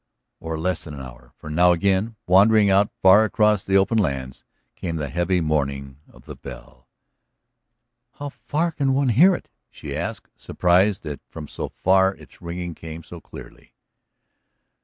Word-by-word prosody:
Or 80 -1 -5
less 85 +2 -2
than 75 -3 -9
an 70 - -8
hour. - - -13
For 75 - -9
now 90 +3 +4
again, 100 +5 0
wandering 100 +2 +5
out 100 +2 +3
far 95 +3 +7
across 105 -2 +2
the 95 0 +2
open 105 +4 +2
lands, 65 -8 -3 0.3
came 85 -2 -4
the 75 -3 -3
heavy 90 +2 0
mourning 70 -3 -2
of - - -20
the - - -9
bell. - - -12 1.2
"How 145 0 -7
far 160 +4 -2
can 135 -3 0
one 135 -1 +1
hear 170 - +5
it?" - - -11 0.2
she - - -8
asked, - - -5
surprised 95 +3 +1
that 75 -4 -6
from 80 -2 -9
so - - -6
far 95 +1 +2
its - - -18
ringing 85 0 -5
came 80 +1 -9
so 85 +1 -11
clearly. - - -14
90 Hz, 160 wpm, -22 LUFS, 75-105 Hz, 1.2 s, far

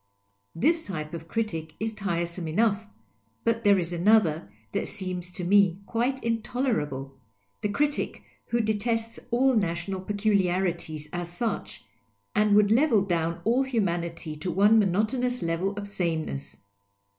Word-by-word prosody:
Tliis 325 - +3
type 155 -4 -5
of 165 -1 -7
critic 165 -7 -3
is 220 0 -2
tiresome 170 -4 -2
enough; 215 +5 +1 0.6
but 230 0 +1
there 200 -2 +6
is 175 -1 -2
another 170 - +3 0.2
that - - -1
seems 185 -3 -3
to 180 - -5
me 190 -1 +4
quite 245 +5 -1
intolerable, 220 - -1 0.5
the 210 - 0
critic 290 +7 -1 0.2
who 235 0 +1
detests 225 +1 -1
all 255 +2 +3
national 185 -1 -1
peculiarities 185 -6 0
as 175 -1 -3
sucli, 175 - -3 0.5
and 210 -1 +4
would 210 0 +5
level 230 -4 +4
down 170 -3 -1
all 240 +4 +3
humanity 175 - -2
to 165 +4 -4
one 205 +6 +5
monotonous 220 +6 +1
level 175 +5 -1
of 205 0 -4
sameness. 165 -7 -3
200 Hz, 135 wpm, -27 LUFS, 170-225 Hz, 0.6 s, there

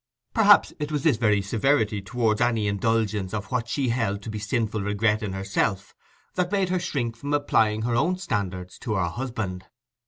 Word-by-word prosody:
Perhaps 205 -2 +5
it 150 0 -3
was 150 -2 -1
this 150 -8 +3
very 105 -3 +2
severity 110 0 +1
towards 110 +3 0
any 115 -3 +2
indulgence 105 -1 0
of 105 +3 -5
what 120 -2 -1
she 135 -1 0
held 105 -4 -1
to 110 - -5
be 105 - -4
sinful 105 +1 -1
regret 105 +2 +1
in 100 -3 -3
herself, 95 0 -1 0.4
that 180 0 -1
made 195 -3 +1
her 185 0 +1
shrink 120 -9 -2
from 140 +5 -2
applying 110 -7 +2
her 120 0 0
own 175 +9 +2
standard 95 - -3
to 110 -3 -2
her 95 -3 +1
husband. 105 -5 -4
110 Hz, 185 wpm, -25 LUFS, 100-130 Hz, 0.4 s, Perhaps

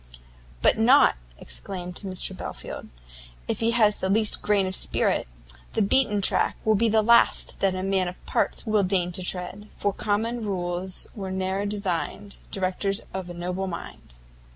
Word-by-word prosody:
"But - - +4
not," - - +6 0.2
exclaimed 175 - -5
Mr 190 0 -2
Belfield, - - -7 0.6
"if - - -2
he 230 - +2
has 220 -3 +3
the 190 - -1
least 215 +2 +3
grain 205 -2 +2
of 185 - -3
spirit! - - 0 0.5
the 220 - +2
beaten 210 -2 +2
track - - +3
will 220 - +4
be 225 +2 +2
the 220 0 +3
last 235 +2 +4
that 195 -1 +1
a 185 - -3
man 190 -1 +1
of 180 - -9
parts - - 0
will 215 -2 +2
deign 180 -2 +1
to 180 - -1
tread, 185 +3 -2
For 200 -1 -1
common 225 +4 -1
rules 185 -2 -1
were 195 -3 -5
ne'er 190 +2 -1
designed 200 0 -3
Directors 195 +1 -1
of 185 -2 -5
a 175 - -7
noble 180 +2 -3
mind." 170 - -8
195 Hz, 165 wpm, -25 LUFS, 185-210 Hz, 0.6 s, not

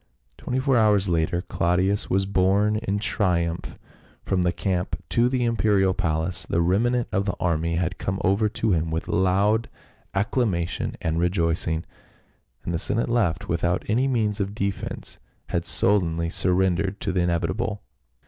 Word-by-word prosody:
Twenty 125 - -3
four 130 -1 +2
hours 105 -3 +3
later 85 +1 0
Claudius 90 +4 0
was 95 +1 +2
borne 100 +2 +2
in 100 -2 -2
triumph 85 -5 -1 0.5
from 95 -2 +1
the 90 -1 +2
camp 90 0 -2
to 120 +1 +3
the 125 -1 0
imperial 105 -5 +2
palace; 85 0 -1
the 85 - -1
remnant 115 +8 +1
of 100 +1 0
the 100 - -1
army 85 -2 0
had 90 +1 -2
come 95 +1 -2
over 100 +3 +2
to 110 +1 -1
him 80 -2 +1
with 80 +1 -3
loud 100 +5 +2 0.5
acclamation 95 -4 -1
and 80 0 -1
rejoicing, 85 -2 0 0.8
and 85 - -2
the 85 - -1
senate 115 +6 0
left 105 -9 0
without 85 +2 0
any 125 +6 +2
means 110 -6 0
of 100 +1 -2
defense 100 -2 -4 0.3
had - - -1
sullenly 85 -4 +2
surrendered 95 +2 +1
to 95 - -1
the 90 0 +1
inevitable. 90 +6 -1
95 Hz, 150 wpm, -24 LUFS, 85-105 Hz, 0.8 s, hours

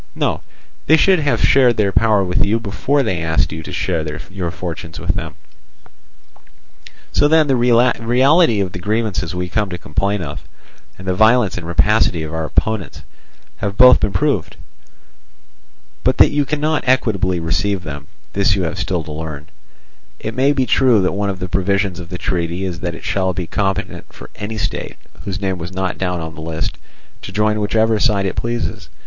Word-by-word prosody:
No, - - -1 0.5
they 160 - +6
should 190 +1 +4
have 145 -2 0
shared 125 -4 +4
their 100 -2 +2
power 105 -1 +3
with 90 -1 +1
you 110 +3 +1
before 130 +6 0
they 95 -8 -1
asked 80 0 +1
you 80 +1 -5
to - - -9
share 80 - -1 0.3
your 95 -3 -3
fortunes 80 -3 -6
with 90 +1 -1
them. 85 -4 -5 1.8
"So 145 - +3
then 160 0 +4
the 135 -2 +2
reality 120 - +3
of 95 -2 -2
the 90 - -7
grievances 105 -3 -2
we 90 0 -2
come 105 +2 -1
to 90 - -5
complain 95 +4 -2
of, 75 -1 -6 0.6
and 95 - -11
the 95 - +1
violence 110 +1 +4
and 85 -2 -6
rapacity 85 0 +2
of 80 0 -6
our 80 0 -2
opponents, 110 +3 -2 0.5
have 100 +9 -4
both 125 0 +8
been 105 - 0
proved. 95 - -1 1.5
But - - +2
that - - +6
you 145 -1 +1
cannot 150 0 -1
equitably 100 -8 +1
receive 90 +4 -1
them, 75 -3 -7 0.3
this 100 0 +2
you 95 - -1
have 80 - -3
still 90 -4 -1
to 75 - -9
learn. 75 -1 -7 0.7
It 110 - -5
may 130 +4 +3
be 135 -3 +1
true 125 -4 +4
that 90 - +1
one 100 +1 -1
of 95 - -3
the 95 - -5
provisions 95 0 0
of 85 -2 -8
the 90 - -5
treaty 90 0 -2
is 90 -2 -4
that 85 -1 -3
it - - -11
shall 95 -1 0
be 90 0 -3
competent 95 +3 -3
for - - -12
any 110 +2 -5
state, - - -4 0.3
whose 95 -2 -3
name 95 -2 -2
was 85 +2 -6
not 95 0 -3
down 90 -2 -1
on 80 0 -6
the 80 - -9
list, 80 0 -4 0.4
to - - -8
join 105 +1 +1
whichever 110 +1 +1
side 100 -4 +2
it 95 - -2
pleases. 120 0 -3
95 Hz, 190 wpm, -18 LUFS, 85-115 Hz, 1.8 s, both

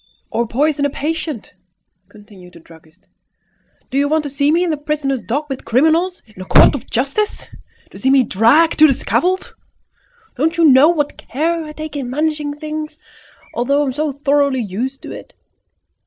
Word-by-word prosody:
"Or 235 0 -1
poison 285 +5 0
a 285 - +2
patient!" 300 -4 -4 0.6
continued 205 -4 -16
the - - -14
druggist. 160 +2 -20 0.9
"Do 270 - +1
you 285 0 +1
want 315 0 +1
to 285 - -6
see 280 +1 +1
me 340 +3 +2
in 350 - 0
the - - 0
prisoner's 290 -3 -2
dock 285 +6 -3
with 270 -2 -6
criminals, 320 +9 +1
in 210 -4 -14
a - - -7
court - - +6
of 280 - -6
justice? 280 - -1 0.5
To - - -12
see 265 - +1
me 270 -1 +5
dragged 245 - +3
to 310 - +8
the 275 - +2
scaffold? 370 +8 -1 0.8
Don't 325 +5 0
you 335 - +4
know 280 +1 +7
what 295 -4 -1
care 325 +6 -2
I 305 - -9
take 310 0 -7
in 270 -4 -4
managing 300 +1 -2
things, 305 0 -6 0.6
although 280 +5 +1
I - - -1
am 260 - -2
so 300 +2 -1
thoroughly 280 -2 +1
used 240 +7 -5
to - - -8
it? - - -11
285 Hz, 185 wpm, -17 LUFS, 255-310 Hz, 0.9 s, to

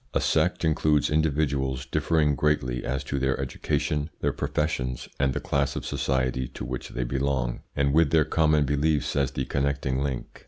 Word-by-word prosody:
A - - +4
sect - - +1
includes 75 -1 +2
individuals 70 -4 0
differing 75 -3 +1
greatly 65 -3 0
as 65 +1 -2
to 70 +1 -2
their 65 0 0
education, 75 +3 -1
their - - 0
professions, 65 -5 -2
and 70 -1 +2
the - - 0
class 70 0 0
of - - -4
society 65 -2 0
to - - -5
which 65 +1 -5
they 60 - -3
belong, 65 -1 -1 0.2
and 70 0 +1
with 80 -1 +4
their 80 0 +4
common 75 -1 +3
beliefs 75 +2 +1
as 70 -1 +2
the 65 - -3
connecting 70 -1 -1
link. 70 -3 -4
70 Hz, 170 wpm, -26 LUFS, 65-75 Hz, 0.2 s, A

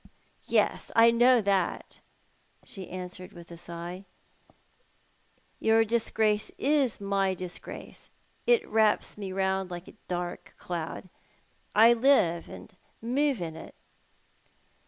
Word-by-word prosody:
"Yes, - - +1
I 230 0 +7
know 240 +1 +5
that," 195 -3 -1 0.7
she 190 -2 -5
auswered, 185 0 -8
with 170 0 -13
a - - -8
sigh. 170 +3 -8 0.8
" - - -38 0.7
Your 225 0 +4
dis 230 +1 0
grace 215 -1 +1
is 280 -4 +2
my 195 -1 0
disgrace. 180 -1 -8 0.4
It 480 -1 +4
wraps 220 -1 +2
me 200 -2 -6
round 190 0 -1
like 175 0 -7
a - - -12
dark 175 -1 -5
cloud. 170 +1 -5 0.7
I 225 +2 +7
live 225 -10 +3
and - - -11 0.2
move 260 +1 0
iu 165 -2 -4
it." 160 - -11
195 Hz, 120 wpm, -28 LUFS, 180-230 Hz, 0.8 s, I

